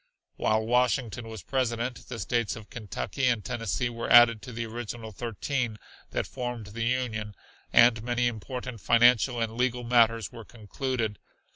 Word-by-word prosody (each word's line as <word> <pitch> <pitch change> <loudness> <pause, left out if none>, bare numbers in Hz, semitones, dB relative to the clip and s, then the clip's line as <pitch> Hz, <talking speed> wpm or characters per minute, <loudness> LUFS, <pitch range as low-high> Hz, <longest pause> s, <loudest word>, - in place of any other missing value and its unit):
While 110 0 +1
Washington 120 -1 +1
was 110 -5 -8
President, 125 +1 -2
the 125 - -5
states 115 +2 -1
of 110 -2 -12
Kentucky 115 +3 -3
and 115 -6 +1
Tennessee 120 +1 -1
were 115 -1 -5
added 120 -2 +7
to 125 - -9
the 115 0 -4
original 115 0 -6
thirteen 120 +2 -3 0.3
that - - -2
formed 125 -3 -5
the 115 0 -2
Union, 115 -4 -2 0.4
and 115 -2 +6
many 120 +1 0
important 120 0 -4
financial 120 +1 +4
and 115 -1 -2
legal 125 0 0
matters 115 -2 +3
were 115 - -9
concluded. 115 0 -4
115 Hz, 150 wpm, -28 LUFS, 110-125 Hz, 0.4 s, added